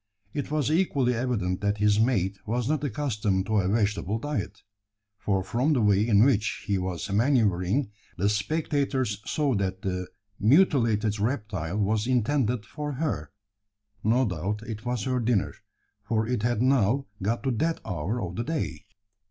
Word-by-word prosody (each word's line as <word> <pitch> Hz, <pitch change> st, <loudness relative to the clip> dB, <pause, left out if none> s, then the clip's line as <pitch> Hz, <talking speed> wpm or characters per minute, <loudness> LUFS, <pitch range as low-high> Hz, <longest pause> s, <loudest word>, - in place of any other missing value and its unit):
It 145 Hz, -2 st, -3 dB
was 150 Hz, -1 st, 0 dB
equally 140 Hz, -7 st, +2 dB
evident 115 Hz, -7 st, -1 dB
that 100 Hz, 0 st, 0 dB
his 105 Hz, 0 st, +3 dB
mate 100 Hz, -5 st, +1 dB
was 120 Hz, +2 st, -1 dB
not 150 Hz, -1 st, 0 dB
accustomed 105 Hz, -8 st, -1 dB
to 110 Hz, 0 st, +2 dB
a 95 Hz, -, +1 dB
vegetable 105 Hz, 0 st, 0 dB
diet: 125 Hz, -5 st, -4 dB, 0.6 s
for 95 Hz, -2 st, 0 dB
from 125 Hz, +10 st, +1 dB
the 125 Hz, -, +2 dB
way 105 Hz, +1 st, +3 dB
in 105 Hz, -2 st, +5 dB
which 110 Hz, -6 st, +1 dB
he 100 Hz, -2 st, 0 dB
was 90 Hz, 0 st, -4 dB
manoeuvring, 105 Hz, -1 st, +2 dB, 0.3 s
the 95 Hz, +2 st, +1 dB
spectators 130 Hz, -1 st, 0 dB
saw 145 Hz, -3 st, +1 dB
that 95 Hz, -2 st, -2 dB
the 90 Hz, -1 st, -2 dB, 0.3 s
mutilated 115 Hz, -, +3 dB
reptile 105 Hz, -, -2 dB
was 105 Hz, +2 st, +1 dB
intended 125 Hz, -2 st, +1 dB
for 150 Hz, -1 st, -5 dB
her. 125 Hz, -, -2 dB, 0.7 s
No 120 Hz, +4 st, +3 dB
doubt 100 Hz, +3 st, -3 dB
it 110 Hz, 0 st, -7 dB
was 120 Hz, -4 st, -1 dB
her 130 Hz, +1 st, 0 dB
dinner, 115 Hz, -4 st, +1 dB, 0.5 s
for 110 Hz, +1 st, -1 dB
it 125 Hz, -3 st, -1 dB
had 120 Hz, 0 st, +1 dB
now 130 Hz, 0 st, +3 dB, 0.2 s
got 115 Hz, +6 st, -1 dB
to 135 Hz, -, +1 dB
that 160 Hz, +8 st, 0 dB
hour 95 Hz, +4 st, -2 dB
of 90 Hz, -2 st, -5 dB
the 115 Hz, -, -1 dB
day. 155 Hz, -7 st, -3 dB
110 Hz, 160 wpm, -27 LUFS, 100-130 Hz, 0.7 s, in